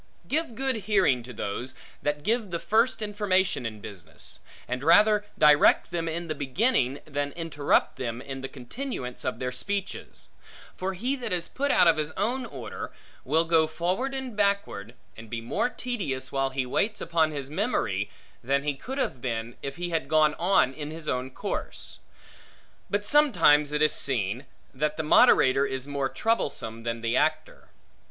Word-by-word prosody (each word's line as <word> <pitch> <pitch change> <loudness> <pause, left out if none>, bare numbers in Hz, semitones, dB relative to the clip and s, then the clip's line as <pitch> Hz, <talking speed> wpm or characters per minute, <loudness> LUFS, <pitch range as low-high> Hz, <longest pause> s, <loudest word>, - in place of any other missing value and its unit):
Give 305 -5 -1
good 265 0 0
hearing 190 - +3
to 125 +2 -10
those, 120 +3 -3 0.3
that 150 0 -1
give 220 0 0
the 170 - -2
first 225 +5 +1
information 195 - +1
in 110 -2 -8
business; 95 -6 -8 0.3
and 125 +1 -3
rather 210 +6 +5
direct 150 +2 +5
them 165 -1 -2
in 170 +1 -4
the 155 - -1
beginning, 140 - +1
than 145 -1 -3
interrupt 160 -4 +1
them 120 -2 -3
in 135 +1 -7
the 135 - -4
continuance 130 - -6
of 130 - -2
their 125 0 -3
speeches; 200 +9 -4 0.5
for 190 +1 -3
he 250 +9 -1
that 245 - -4
is 175 -2 -1
put 285 +2 -2
out 180 - +5
of 165 - +5
his 155 +1 -2
own 245 +5 -1
order, 130 - -7 0.3
will 160 +5 +2
go 165 -1 +4
forward 185 +12 -1
and 260 -4 -5
backward, 200 - 0 0.2
and 110 0 -11
be 120 - -3
more 115 - -1
tedious, 165 - -3
while 135 0 0
he 130 -1 -2
waits 205 - 0
upon 165 -2 +2
his 140 -2 -6
memory, 105 - -1 0.3
than 140 +3 +1
he 145 0 0
could 255 - -7
have 130 - -2
been, 115 -1 -3
if 140 - -5
he 175 0 -4
had 165 -1 -1
gone 155 -1 +4
on 175 -7 +3
in 150 0 -6
his 160 0 -8
own 125 +1 -1
course. 130 - -5 0.9
But 205 +1 -1
sometimes 175 - +5
it 150 0 +1
is 155 - +4
seen, 125 0 -1 0.3
that 150 +3 -1
the 160 - -1
moderator 135 -3 +5
is 130 0 -4
more 140 -2 -1
troublesome, 120 - -1
than 115 0 -3
the 115 +1 0
actor. 155 +3 0
155 Hz, 175 wpm, -27 LUFS, 130-200 Hz, 0.9 s, rather